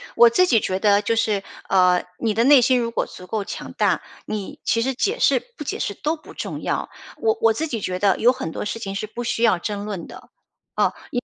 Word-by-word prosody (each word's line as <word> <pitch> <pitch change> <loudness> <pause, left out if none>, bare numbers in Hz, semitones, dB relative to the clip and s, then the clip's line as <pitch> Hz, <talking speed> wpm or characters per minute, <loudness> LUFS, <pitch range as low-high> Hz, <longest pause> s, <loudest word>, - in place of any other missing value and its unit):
我 235 0 +8
自 365 +11 +4
己 230 -7 +4
觉 185 -1 -2
得 205 0 +4
就 230 +2 0
是， 215 -3 0 0.3
呃， 180 -1 +4 0.2
你 225 -2 0
的 225 +2 +2
内 275 0 +7
心 250 +1 +3
如 230 -1 -2
果 - - -1
足 180 - -12
够 210 +2 -2
强 - - -7
大， - - +1 0.2
你， 215 +8 -5
其 230 - +1
实 265 +3 0
解 430 - 0
释 - - +4 0.2
不 300 - -5
解 - - -4
释 200 - -2
都 305 +10 -2
不 310 - -14
重 - - -5
要。 - - -2 0.3
我 445 -1 +2
我 225 0 +5
自 315 +9 -2
己 230 -7 -4
觉 185 -1 -3
得， 200 -2 +3
有 240 - +5
很 255 -10 -5
多 - - -5
事 230 - -4
情 195 -3 -5
是 215 - -3
不 240 +3 -6
需 230 - -1
要 225 -6 +4
争 205 +2 -4
论 195 -5 -5
的。 - - -13 0.5
啊， - - +2 0.2
因 245 - 0
为 - - -14
225 Hz, 270 characters per minute, -22 LUFS, 200-245 Hz, 0.5 s, 我